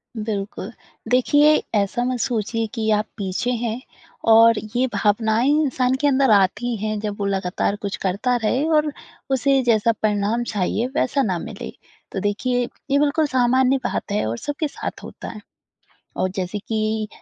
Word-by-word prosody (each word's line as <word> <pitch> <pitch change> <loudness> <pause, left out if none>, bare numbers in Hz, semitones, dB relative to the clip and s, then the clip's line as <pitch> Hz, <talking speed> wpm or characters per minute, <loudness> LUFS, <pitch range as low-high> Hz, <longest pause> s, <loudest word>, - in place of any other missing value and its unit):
बिल्कुल। 210 -1 -4 0.4
देखिए 290 +4 +5 0.2
ऐसा 205 +4 +1
मत 250 0 -1
सोचिए 225 -1 -1
कि 220 -1 -1
आप 210 0 +2
पीछे 200 +5 -2
हैं 235 +2 -2 0.5
और 230 0 +7 0.2
ये 255 +2 +3
भावनाएँ 220 +5 +2
इंसान 260 -3 +1
के 290 - +3
अंदर 270 -2 +3
आती 210 +5 +2
हैं 215 -1 -1
जब 210 -1 -4
वो 200 - -1
लगातार 195 0 -1
कुछ 200 -1 -3
करता 205 +7 +1
रहे 255 +6 +1
और 300 0 +1 0.4
उसे 270 +1 +3
जैसा 230 -2 +3
परिणाम 215 +2 +1
चाहिए 210 +5 0
वैसा 275 +2 +1
ना 185 -4 0
मिले। - - -7 0.4
तो 195 - -3
देखिए 245 +5 0 0.2
ये 280 - +4
बिल्कुल 295 +2 +2
सामान्य 260 0 +3
बात - - -2
है 205 - 0
और 115 +2 -3
सबके 290 - -3
साथ - - -7
होता - - -9
है। 215 - -9 0.8
और 185 - +1
जैसे 190 +2 -2
कि 215 0 -2
225 Hz, 160 wpm, -22 LUFS, 205-255 Hz, 0.8 s, और